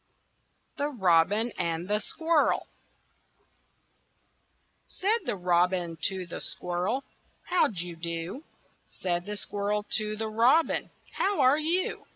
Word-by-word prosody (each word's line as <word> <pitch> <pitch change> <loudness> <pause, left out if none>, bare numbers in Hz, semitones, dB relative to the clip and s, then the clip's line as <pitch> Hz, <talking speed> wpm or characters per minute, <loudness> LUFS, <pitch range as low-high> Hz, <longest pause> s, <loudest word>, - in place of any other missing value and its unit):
THE 285 - +1
ROBIN 205 - +3
AND 170 0 -1
THE 210 +1 +2
SQUIRREL 320 +6 +1 2.2
Said 425 +5 0
the - - 0
Robin 175 -1 +1
to 190 -2 -1
the 170 - -7
Squirrel, 180 +9 -2 0.4
"How 360 0 +3
d' 185 -6 -4
you 175 -1 -5
do?" 170 - -4 0.4
Said 175 0 -3
the 210 0 -4
Squirrel 205 +1 -2
to 215 0 -2
the 220 +1 -2
Robin, 245 +9 +3 0.3
"How 400 -2 +1
are 265 +3 +5
you?" 340 +4 0
205 Hz, 120 wpm, -28 LUFS, 175-265 Hz, 2.2 s, are